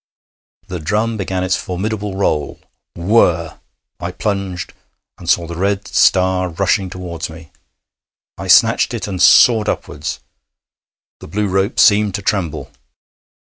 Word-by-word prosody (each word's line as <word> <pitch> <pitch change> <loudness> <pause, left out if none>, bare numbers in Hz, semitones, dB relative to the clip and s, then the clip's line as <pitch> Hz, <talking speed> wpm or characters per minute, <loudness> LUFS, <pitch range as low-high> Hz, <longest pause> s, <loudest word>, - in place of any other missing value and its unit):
The 90 - -5
drum 105 +8 -1
began 95 -3 -3
its 95 0 +1
formidable 100 +2 -4
roll. 75 -7 -1 0.4
Whirrr! 85 -4 +1 0.4
I 85 - -4
plunged, 95 -2 -4 0.5
and 85 - -7
saw 85 -1 +3
the 85 +1 -7
red 100 +3 -1
star 95 -1 +2
rushing 95 +2 0
towards 85 -3 -6
me. 80 0 -13 0.8
I - - -7
snatched - - +4
it - - -4
and 95 -3 -4
soared 110 -3 +6
upwards. - - -4 1.0
The - - -11
blue 105 +5 -2
rope 95 +4 0
seemed 105 -2 +4
to 100 - -5
tremble. 95 -7 -2
95 Hz, 130 wpm, -17 LUFS, 85-100 Hz, 1.0 s, soared